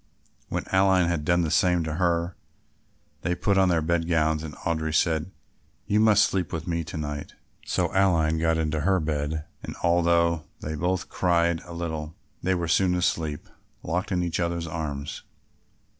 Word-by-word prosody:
When -, -, -2 dB
Aline 95 Hz, -1 st, +4 dB
had 85 Hz, -3 st, -1 dB
done 85 Hz, +2 st, +2 dB
the 80 Hz, -2 st, -1 dB
same 90 Hz, -2 st, +3 dB
to 80 Hz, -1 st, -3 dB
her, 85 Hz, 0 st, +1 dB, 0.9 s
they 90 Hz, +1 st, 0 dB
put 100 Hz, +3 st, +1 dB
on 95 Hz, -1 st, +4 dB
their 80 Hz, -3 st, +2 dB
bed 85 Hz, +1 st, 0 dB
gowns 80 Hz, -2 st, +2 dB
and 80 Hz, -2 st, -7 dB
Audry 80 Hz, -1 st, -2 dB
said, 80 Hz, 0 st, +1 dB, 0.6 s
"You 105 Hz, -, +2 dB
must 110 Hz, -2 st, +5 dB
sleep 90 Hz, -4 st, -2 dB
with 80 Hz, -1 st, -4 dB
me 85 Hz, -1 st, -1 dB
to 80 Hz, -, -6 dB
night." 75 Hz, -1 st, -5 dB, 0.3 s
So -, -, 0 dB
Aline 80 Hz, -5 st, +3 dB
got 80 Hz, 0 st, +2 dB
into 80 Hz, -1 st, -1 dB
her 95 Hz, +4 st, +2 dB
bed 75 Hz, 0 st, -2 dB, 0.2 s
and -, -, -7 dB
although 85 Hz, -2 st, +3 dB
they 75 Hz, -, -5 dB
both 90 Hz, +3 st, -1 dB
cried 85 Hz, -2 st, +1 dB
a 85 Hz, -, -9 dB
little, 80 Hz, -2 st, -4 dB, 0.3 s
they 95 Hz, +2 st, +1 dB
were 85 Hz, -1 st, -2 dB
soon 90 Hz, +2 st, +3 dB
asleep 80 Hz, -4 st, -1 dB, 0.4 s
locked 90 Hz, +5 st, -2 dB
in 90 Hz, -1 st, +1 dB
each 85 Hz, -1 st, -2 dB
other's 85 Hz, -1 st, -1 dB
arms. 75 Hz, -3 st, -4 dB
85 Hz, 175 wpm, -26 LUFS, 80-90 Hz, 0.9 s, must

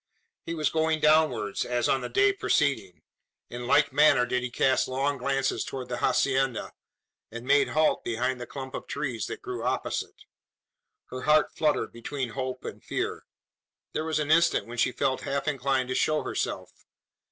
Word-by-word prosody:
He 165 Hz, -, -3 dB
was 155 Hz, -2 st, 0 dB
going 160 Hz, 0 st, +1 dB
downwards, 150 Hz, -9 st, +2 dB
as 120 Hz, -1 st, 0 dB
on 135 Hz, -, +2 dB
the 125 Hz, -, -5 dB
day 400 Hz, 0 st, +3 dB
preceding. 140 Hz, -, 0 dB, 0.5 s
In 120 Hz, 0 st, -6 dB
like -, -, +3 dB
manner 145 Hz, -4 st, +5 dB
did 125 Hz, +1 st, -1 dB
he 125 Hz, -, -3 dB
cast 130 Hz, +2 st, +2 dB
long 135 Hz, +2 st, -1 dB
glances 135 Hz, +1 st, 0 dB
towards 130 Hz, -2 st, -6 dB
the 125 Hz, -, -3 dB
hacienda, 130 Hz, -1 st, +1 dB, 0.6 s
and 115 Hz, +2 st, -8 dB
made 140 Hz, +1 st, +4 dB
halt 155 Hz, 0 st, +1 dB
behind 125 Hz, +2 st, -1 dB
the 120 Hz, -, -6 dB
clump 130 Hz, -2 st, -7 dB
of -, -, -6 dB
trees 130 Hz, -7 st, -3 dB
that -, -, -7 dB
grew -, -, -5 dB
opposite. -, -, -3 dB, 0.9 s
Her 130 Hz, -, -5 dB
heart 150 Hz, +2 st, +3 dB
fluttered 155 Hz, -2 st, +1 dB
between 125 Hz, +2 st, -4 dB
hope 130 Hz, +1 st, -5 dB
and -, -, -7 dB
fear. -, -, -3 dB, 0.7 s
There 155 Hz, -, -1 dB
was 160 Hz, -1 st, -1 dB
an 150 Hz, 0 st, -1 dB
instant 165 Hz, -9 st, +4 dB
when 120 Hz, +2 st, -7 dB
she -, -, +3 dB
felt 130 Hz, +1 st, -1 dB
half 140 Hz, +1 st, -3 dB
inclined 135 Hz, -2 st, 0 dB
to -, -, 0 dB
show 155 Hz, +3 st, +1 dB
herself. -, -, -3 dB
135 Hz, 175 wpm, -27 LUFS, 125-150 Hz, 0.9 s, manner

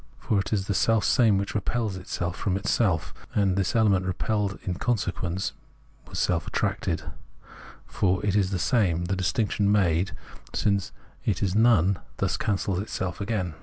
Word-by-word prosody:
For 105 Hz, -, 0 dB
it 95 Hz, -, -3 dB
is 100 Hz, -4 st, 0 dB
the 100 Hz, -, -1 dB
selfsame 110 Hz, +3 st, +3 dB
which 100 Hz, 0 st, -2 dB
repels 110 Hz, -1 st, -1 dB
itself 90 Hz, -1 st, -4 dB
from 95 Hz, -2 st, -1 dB
itself, 100 Hz, -4 st, +1 dB, 0.2 s
and 100 Hz, -3 st, +2 dB
this 95 Hz, +3 st, 0 dB
element 100 Hz, -5 st, +4 dB
repelled 100 Hz, +2 st, -1 dB
is -, -, -17 dB
in -, -, 0 dB
consequence 95 Hz, -5 st, -1 dB, 0.5 s
essentially 90 Hz, -, -10 dB
self 90 Hz, -3 st, 0 dB
attracted, -, -, -1 dB, 0.8 s
for 95 Hz, 0 st, 0 dB
it 100 Hz, -1 st, +1 dB
is 100 Hz, -3 st, +3 dB
the 95 Hz, -, -1 dB
same; 90 Hz, -5 st, +1 dB
the 95 Hz, +2 st, -1 dB
distinction 100 Hz, +2 st, +1 dB
made, 95 Hz, -2 st, +2 dB, 0.4 s
since 100 Hz, -3 st, +1 dB, 0.3 s
it -, -, 0 dB
is 95 Hz, -2 st, 0 dB
none, 100 Hz, -4 st, +4 dB, 0.2 s
thus 95 Hz, -3 st, 0 dB
cancels 100 Hz, -2 st, -1 dB
itself 95 Hz, -3 st, -4 dB
again. 100 Hz, -5 st, -2 dB
100 Hz, 160 wpm, -26 LUFS, 90-105 Hz, 0.8 s, element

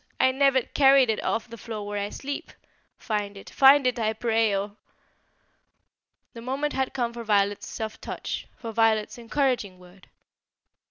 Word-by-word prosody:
I 260 Hz, -, +4 dB
never 265 Hz, -1 st, +3 dB
carried 270 Hz, -3 st, +4 dB
it 215 Hz, -, -3 dB
off 225 Hz, -, -1 dB
the 230 Hz, -1 st, -11 dB
floor 215 Hz, -1 st, -6 dB
where 205 Hz, 0 st, -3 dB
I 205 Hz, -, -4 dB
sleep. 280 Hz, +5 st, -6 dB, 0.5 s
Find 205 Hz, -3 st, -3 dB
it; 195 Hz, -, -12 dB
find 275 Hz, 0 st, +6 dB
it, 250 Hz, -1 st, +1 dB
I 220 Hz, -1 st, 0 dB
pray, 225 Hz, -2 st, +1 dB
or 200 Hz, +1 st, -3 dB, 0.8 s
" -, -, -51 dB
The 230 Hz, -, -9 dB
moment 270 Hz, +5 st, -2 dB
had 265 Hz, -1 st, -1 dB
come 240 Hz, -3 st, -1 dB
for 235 Hz, 0 st, -7 dB
Violet's 205 Hz, -2 st, +1 dB
soft 220 Hz, -1 st, -6 dB
touch, -, -, -5 dB
for 230 Hz, -, -6 dB
Violet's 220 Hz, 0 st, +1 dB
encouraging 235 Hz, -5 st, -1 dB
word. 180 Hz, +1 st, -18 dB
230 Hz, 165 wpm, -26 LUFS, 210-260 Hz, 0.8 s, find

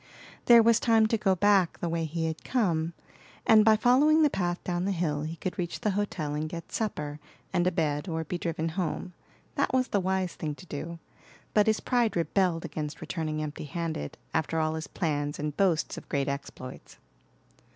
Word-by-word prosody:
There 235 Hz, -1 st, +8 dB
was 230 Hz, 0 st, +5 dB
time 225 Hz, -2 st, +4 dB
to 225 Hz, -, +2 dB
go 195 Hz, -2 st, +3 dB
back 195 Hz, -1 st, +3 dB
the 175 Hz, -, -3 dB
way 165 Hz, -1 st, -1 dB
he 165 Hz, +1 st, -2 dB
had 160 Hz, -1 st, -4 dB
come, 170 Hz, -9 st, 0 dB, 0.5 s
and 220 Hz, -1 st, +7 dB
by 220 Hz, 0 st, +6 dB
following 285 Hz, +8 st, +5 dB
the 295 Hz, -, +4 dB
path 175 Hz, -2 st, -1 dB
down 175 Hz, 0 st, -1 dB
the 200 Hz, -, +1 dB
hill 165 Hz, -5 st, -1 dB
he 155 Hz, +2 st, -4 dB
could 185 Hz, +2 st, -5 dB
reach 175 Hz, -1 st, -3 dB
the 210 Hz, -, +1 dB
hotel 185 Hz, -7 st, -2 dB
and 155 Hz, +1 st, -2 dB
get 170 Hz, 0 st, -7 dB
supper 150 Hz, -9 st, -3 dB, 0.3 s
and 175 Hz, 0 st, +2 dB
a -, -, +3 dB
bed, 150 Hz, -2 st, -1 dB
or 160 Hz, -1 st, -2 dB
be 175 Hz, +3 st, -4 dB
driven 165 Hz, -1 st, -2 dB
home. 180 Hz, +1 st, -3 dB, 0.4 s
That -, -, 0 dB
was 255 Hz, 0 st, +2 dB
the 200 Hz, -, +2 dB
wise 190 Hz, -1 st, 0 dB
thing 150 Hz, -2 st, -4 dB
to 185 Hz, -, -13 dB
do, 165 Hz, +1 st, -6 dB, 0.6 s
but 210 Hz, 0 st, +4 dB
his 220 Hz, 0 st, +2 dB
pride 240 Hz, -3 st, +1 dB
rebelled 175 Hz, 0 st, +1 dB
against 155 Hz, -1 st, -5 dB
returning 155 Hz, -2 st, -3 dB
empty 150 Hz, 0 st, -5 dB
handed 160 Hz, -, -4 dB, 0.2 s
after 160 Hz, +1 st, 0 dB
all 155 Hz, 0 st, +1 dB
his 160 Hz, 0 st, -4 dB
plans 145 Hz, -3 st, -2 dB
and 150 Hz, 0 st, -3 dB
boasts 180 Hz, -5 st, +1 dB
of -, -, -20 dB
great 140 Hz, -2 st, 0 dB
exploits. 140 Hz, -2 st, -7 dB
170 Hz, 195 wpm, -28 LUFS, 155-200 Hz, 0.6 s, There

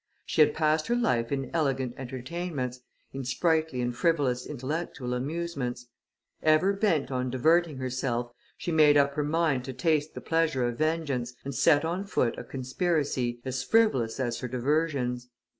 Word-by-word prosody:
She -, -, +2 dB
had 150 Hz, -, +5 dB
passed 155 Hz, 0 st, +1 dB
her 240 Hz, -, +2 dB
life 120 Hz, -, +1 dB
in 135 Hz, -2 st, -2 dB
elegant 135 Hz, -6 st, 0 dB
entertainments, 130 Hz, 0 st, -4 dB, 0.3 s
in 135 Hz, 0 st, -4 dB
sprightly 155 Hz, +1 st, +1 dB
and 120 Hz, 0 st, -2 dB
frivolous 135 Hz, -4 st, +1 dB
intellectual 135 Hz, -2 st, -4 dB
amusements; 135 Hz, -2 st, -3 dB, 0.6 s
ever 155 Hz, +5 st, +4 dB
bent 195 Hz, -9 st, +1 dB
on 130 Hz, 0 st, -1 dB
diverting 155 Hz, +4 st, +2 dB
herself, 125 Hz, -2 st, -2 dB, 0.3 s
she 175 Hz, -, -3 dB
made 150 Hz, -2 st, +6 dB
up 140 Hz, 0 st, +3 dB
her 150 Hz, -, -1 dB
mind 150 Hz, -3 st, +1 dB
to 130 Hz, -, -5 dB
taste 150 Hz, +3 st, 0 dB
the -, -, -4 dB
pleasure 160 Hz, -6 st, +1 dB
of 120 Hz, -1 st, -4 dB
vengeance, 145 Hz, -6 st, -1 dB
and 140 Hz, -, -4 dB
set 145 Hz, +4 st, +4 dB
on 180 Hz, +4 st, -2 dB
foot 125 Hz, -, 0 dB
a -, -, -6 dB
conspiracy, 130 Hz, -2 st, -1 dB
as 130 Hz, 0 st, -2 dB
frivolous 135 Hz, -, +2 dB
as 120 Hz, -3 st, -1 dB
her 125 Hz, -, -4 dB
diversions. 125 Hz, -1 st, -1 dB
140 Hz, 160 wpm, -28 LUFS, 125-160 Hz, 0.6 s, made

